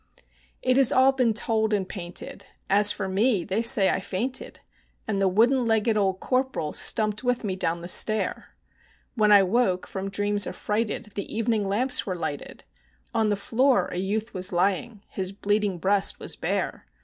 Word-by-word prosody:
It 255 0 +2
has 270 -3 +5
all 260 +1 +5
been 255 -4 +1
told 220 0 0
and 195 -3 -1
painted; 175 -3 -6 0.2
as 205 +1 +5
for 195 - -4
me, 200 +1 +1
they 200 +5 -1
say 230 -5 +4
I - - -1
fainted, 205 +7 -5 0.5
And 200 -3 -1
the 195 - +3
wooden 235 +6 +2
legged 225 0 +1
old 190 -3 0
Corporal 255 - -2
stumped 215 +1 +1
with 245 -1 -1
me 195 -3 -2
down 170 -2 -2
the 175 - -7
stair: 215 +4 +1 0.6
When 215 -3 +2
I 200 -1 +7
woke 190 -2 0
from 195 0 -5
dreams 205 +1 +2
affrighted 215 +1 -3
the 200 - -6
evening 220 -2 -1
lamps 250 +6 0
were 185 - -2
lighted, 150 -4 -6 0.5
On 220 -1 +1
the 205 - +1
floor 250 +6 +1
a - - -5
youth 210 +5 -3
was 185 -1 -1
lying; 195 +4 -1
his 190 -1 -4
bleeding 205 -1 -1
breast 195 +3 +1
was - - -3
bare. - - -3
210 Hz, 175 wpm, -25 LUFS, 190-230 Hz, 0.6 s, I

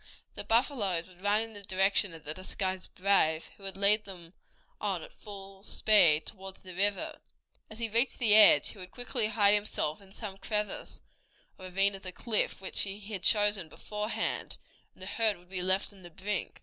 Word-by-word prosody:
The - - -5
buffaloes 225 - +1
would 180 -1 -18
run 205 +2 +2
in 225 0 -6
the 205 - -8
direction 195 -1 +2
of 160 - -13
the 150 - -4
disguised 185 +1 -4
brave, 180 -5 +1
who - - -23
would 195 -1 -5
lead 210 +2 +4
them 180 -3 -11 0.5
on - - -2
at - - -13
full 195 -2 -11
speed 170 -8 +3
toward 190 -2 -6
the 185 -1 -11
river. 200 +2 -1 0.5
As 215 - -10
he 230 0 -2
reached 230 +4 +1
the 225 -4 +4
edge 215 0 +8
he 205 - -10
would 180 0 -8
quickly 245 -2 -1
hide 205 -2 +4
himself 205 -6 -1
in 195 -1 -18
some 195 -2 -8
crevice 210 -1 -3 0.6
or 185 - -9
ravine 195 +2 +1
of 195 - -6
the 185 - -6
cliff, 215 -1 0
which 190 - -1
he 195 0 -2
had 200 -2 -6
chosen 205 -4 +3
beforehand, 210 +5 -4 0.4
and - - -13
the - - -7
herd 215 0 0
would 175 +1 -22
be 185 -1 -3
left 190 +3 +1
on 195 - -17
the 175 - -11
brink. 190 +3 -5
195 Hz, 195 wpm, -30 LUFS, 185-210 Hz, 0.6 s, edge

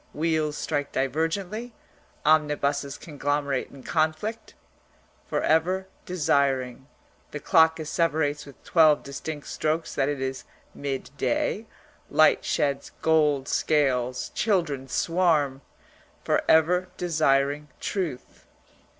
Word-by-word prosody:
Wheels 155 -1 0
strike 145 -2 -2
divergently. 175 - -2 0.5
Omnibuses 145 -2 +1
conglomerate 145 -3 -2
in 135 -2 -13
conflict) 160 +8 -2 0.7
for - - -1
ever 180 +4 +2 0.2
desiring 135 -7 0 0.4
(the 150 - -6
clock 160 +2 +4
asseverates 155 -2 0
with 140 - -15
twelve 155 -3 +4
distinct 145 +2 -6
strokes 155 +1 -2
that 135 0 +1
it 145 -2 -2
is 130 0 -3 0.3
midday; 140 -2 -2 0.4
light - - +4
sheds 140 -1 -1
gold 150 -4 +3
scales; 125 -4 +1
children 165 -11 0
swarm) 150 -3 +1 0.6
for - - +2
ever 180 +3 +4
desiring 150 -4 +1
truth. 165 -11 -4
150 Hz, 100 wpm, -26 LUFS, 140-160 Hz, 0.7 s, clock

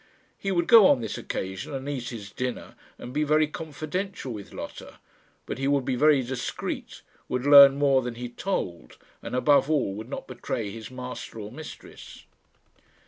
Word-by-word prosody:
He 195 - -2
would 170 -2 +1
go 220 -2 +8
on 135 - +4
this 110 - -4
occasion 95 +8 -5
and 135 +1 -5
eat 130 -4 -3
his 105 -4 -8
dinner 125 +1 -4 0.2
and 125 - -9
be 150 +2 +1
very 155 +1 +3
confidential 155 0 -5
with 105 -2 -9
Lotta; - - -9 0.5
but - - -5
he 135 - 0
would 140 -2 +2
be 130 - 0
very 145 0 +4
discreet, 125 0 -5 0.3
would 125 +1 -2
learn 140 -1 +9
more 140 -2 +3
than 125 -1 -5
he 125 +1 -5
told, 90 - -4 0.2
and, - - -5
above 140 +2 +4
all, 140 -10 +1
would 110 +4 -8
not - - -5
betray 115 -4 -4
his 110 0 -8
master 125 -2 -7
or 105 0 -7
mistress. 155 -1 -11
130 Hz, 175 wpm, -26 LUFS, 120-150 Hz, 0.5 s, learn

